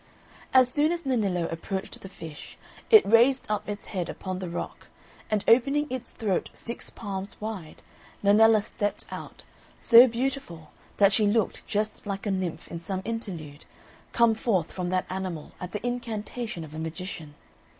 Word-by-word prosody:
As 260 Hz, -1 st, +6 dB
soon 295 Hz, +5 st, +2 dB
as 345 Hz, 0 st, -2 dB
Nennillo 200 Hz, -10 st, +1 dB
approached 190 Hz, +3 st, -5 dB
the 195 Hz, -, -9 dB
fish, 160 Hz, -5 st, -10 dB, 0.3 s
it 435 Hz, -2 st, +8 dB
raised 240 Hz, +5 st, +5 dB
up 210 Hz, 0 st, -2 dB
its 205 Hz, 0 st, -4 dB
head 180 Hz, -3 st, -2 dB
upon 185 Hz, -1 st, -5 dB
the 185 Hz, -2 st, -5 dB
rock, 170 Hz, -, -6 dB, 0.4 s
and 210 Hz, -2 st, +1 dB
opening 275 Hz, +5 st, +4 dB
its 255 Hz, -2 st, -4 dB
throat 205 Hz, -5 st, -1 dB
six 235 Hz, -, -6 dB
palms 195 Hz, -2 st, -6 dB
wide, 210 Hz, -7 st, -6 dB, 0.4 s
Nennella 215 Hz, +1 st, +6 dB
stepped 205 Hz, 0 st, -3 dB
out, -, -, -8 dB, 0.4 s
so 235 Hz, +2 st, +9 dB
beautiful 235 Hz, -, -3 dB, 0.3 s
that 200 Hz, -1 st, +6 dB
she 210 Hz, +1 st, +4 dB
looked 215 Hz, 0 st, 0 dB
just 215 Hz, 0 st, -2 dB
like 195 Hz, 0 st, -4 dB
a 205 Hz, -, 0 dB
nymph 180 Hz, -4 st, -3 dB
in 170 Hz, -, -5 dB
some 185 Hz, +2 st, -4 dB
interlude, 175 Hz, -11 st, -5 dB, 0.5 s
come 235 Hz, -1 st, +4 dB
forth 205 Hz, -7 st, 0 dB
from 180 Hz, -1 st, -3 dB
that 185 Hz, 0 st, 0 dB
animal 185 Hz, -4 st, -5 dB
at 180 Hz, 0 st, -5 dB
the 210 Hz, +4 st, -5 dB
incantation 235 Hz, -4 st, -4 dB
of 155 Hz, -1 st, -10 dB
a 155 Hz, -, -6 dB
magician. 160 Hz, -2 st, -6 dB
205 Hz, 160 wpm, -27 LUFS, 180-230 Hz, 0.5 s, so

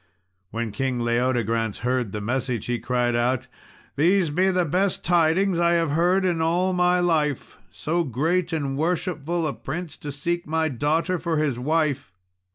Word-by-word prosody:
When 115 Hz, 0 st, -3 dB
King 125 Hz, +3 st, -2 dB
Leodegrance 115 Hz, -2 st, 0 dB
heard 125 Hz, -4 st, 0 dB
the 105 Hz, -, -4 dB
message, 120 Hz, 0 st, -2 dB
he 120 Hz, -1 st, -1 dB
cried 120 Hz, +1 st, 0 dB
out 125 Hz, +2 st, 0 dB, 0.5 s
"These 170 Hz, +2 st, +3 dB
be 185 Hz, +5 st, +2 dB
the 180 Hz, -2 st, +1 dB
best 185 Hz, +5 st, 0 dB
tidings 175 Hz, +2 st, +3 dB
I 170 Hz, 0 st, +3 dB
have 165 Hz, -3 st, +1 dB
heard 180 Hz, +5 st, +2 dB
in 170 Hz, -3 st, +1 dB
all 175 Hz, +3 st, +1 dB
my 180 Hz, 0 st, +3 dB
life 155 Hz, -6 st, 0 dB
so 170 Hz, +3 st, -1 dB
great 165 Hz, +7 st, 0 dB
and 140 Hz, -4 st, -2 dB
worshipful 170 Hz, +1 st, -1 dB
a 145 Hz, -, -1 dB
prince 165 Hz, -2 st, -6 dB
to 145 Hz, -, -6 dB
seek 170 Hz, +5 st, -3 dB
my 160 Hz, 0 st, 0 dB
daughter 160 Hz, +7 st, 0 dB
for 165 Hz, -2 st, -1 dB
his 145 Hz, -5 st, 0 dB
wife! 145 Hz, -4 st, 0 dB
155 Hz, 165 wpm, -24 LUFS, 125-175 Hz, 0.5 s, These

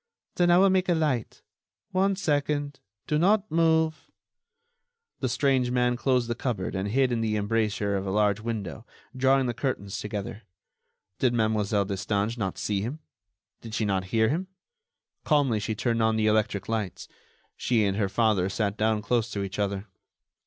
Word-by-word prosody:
Then 175 Hz, -1 st, +2 dB
I 175 Hz, -, +6 dB
will 195 Hz, +1 st, +5 dB
make 185 Hz, -1 st, +1 dB
a 175 Hz, -, +4 dB
light... 145 Hz, -8 st, -1 dB, 0.5 s
one 195 Hz, +1 st, +2 dB
second... 145 Hz, -4 st, -1 dB, 0.3 s
do 150 Hz, -, 0 dB
not 205 Hz, +4 st, +2 dB
move...." 160 Hz, -1 st, +2 dB, 1.1 s
The 130 Hz, -, -1 dB
strange 130 Hz, 0 st, +2 dB
man 125 Hz, 0 st, +2 dB
closed 125 Hz, -1 st, +1 dB
the 120 Hz, -, -1 dB
cupboard 115 Hz, -6 st, -3 dB
and 95 Hz, +1 st, -2 dB
hid 130 Hz, +3 st, +2 dB
in 115 Hz, -1 st, 0 dB
the 110 Hz, -1 st, 0 dB
embrasure 105 Hz, -1 st, 0 dB
of 95 Hz, 0 st, -2 dB
a -, -, -1 dB
large 105 Hz, +1 st, +2 dB
window, 110 Hz, -3 st, -5 dB, 0.3 s
drawing 135 Hz, +1 st, +3 dB
the 120 Hz, -, -1 dB
curtains 105 Hz, -7 st, -3 dB
together. 105 Hz, 0 st, -5 dB, 0.8 s
Did 125 Hz, -2 st, +2 dB
Mlle. 105 Hz, -2 st, +1 dB
Destange 100 Hz, +3 st, -1 dB
not 95 Hz, -6 st, -3 dB
see 100 Hz, -2 st, -1 dB
him? 120 Hz, +9 st, -4 dB, 0.6 s
Did 110 Hz, -1 st, -7 dB
she 115 Hz, -, 0 dB
not 95 Hz, -2 st, 0 dB
hear 110 Hz, +3 st, +2 dB
him? 175 Hz, +6 st, -1 dB, 0.8 s
Calmly 140 Hz, -8 st, +2 dB
she 110 Hz, +1 st, -3 dB
turned 115 Hz, +1 st, 0 dB
on 110 Hz, 0 st, +2 dB
the 110 Hz, -1 st, +1 dB
electric 105 Hz, -3 st, +1 dB
lights; 110 Hz, -5 st, -3 dB, 0.5 s
she 115 Hz, -4 st, +1 dB
and 100 Hz, -1 st, 0 dB
her 100 Hz, -3 st, 0 dB
father 100 Hz, -3 st, +2 dB
sat 100 Hz, 0 st, -1 dB
down 110 Hz, -1 st, +1 dB
close 115 Hz, 0 st, 0 dB
to 100 Hz, -3 st, -3 dB
each 100 Hz, +1 st, -5 dB
other. 100 Hz, -1 st, -1 dB
115 Hz, 170 wpm, -27 LUFS, 105-135 Hz, 1.1 s, I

